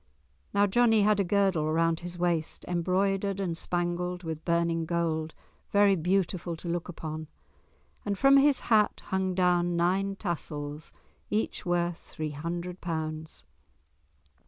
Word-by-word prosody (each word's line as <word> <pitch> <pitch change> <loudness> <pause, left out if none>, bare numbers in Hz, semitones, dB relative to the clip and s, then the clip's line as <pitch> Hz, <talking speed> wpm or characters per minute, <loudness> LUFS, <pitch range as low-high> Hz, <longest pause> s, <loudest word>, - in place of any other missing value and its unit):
Now 200 0 +4
Johnie 225 +1 +4
had 210 0 +3
a - - +4
girdle 185 -5 +1
round 165 0 +2
his 175 0 -6
waist 170 -3 -1
embroidered 195 +3 0
and 180 -4 -1
spangled 175 +1 -2
with 160 -1 -5
burning 170 -1 +1
gold, 160 -2 -1 0.3
very 200 -1 +5
beautiful 180 0 0
to 165 - -9
look 170 +1 -2
upon, 155 -2 -6 0.8
and 200 -1 -2
from 275 +3 +6
his 280 -1 +4
hat 215 -3 +2
hung 190 -1 0
down 175 -1 +2
nine 190 +3 +1
tassels, 150 -5 -5 0.4
each 210 -3 -2
worth 175 -1 +1
three 155 -1 -6
hundred 170 +4 -5
pounds. 155 - -4
175 Hz, 135 wpm, -28 LUFS, 165-195 Hz, 0.8 s, from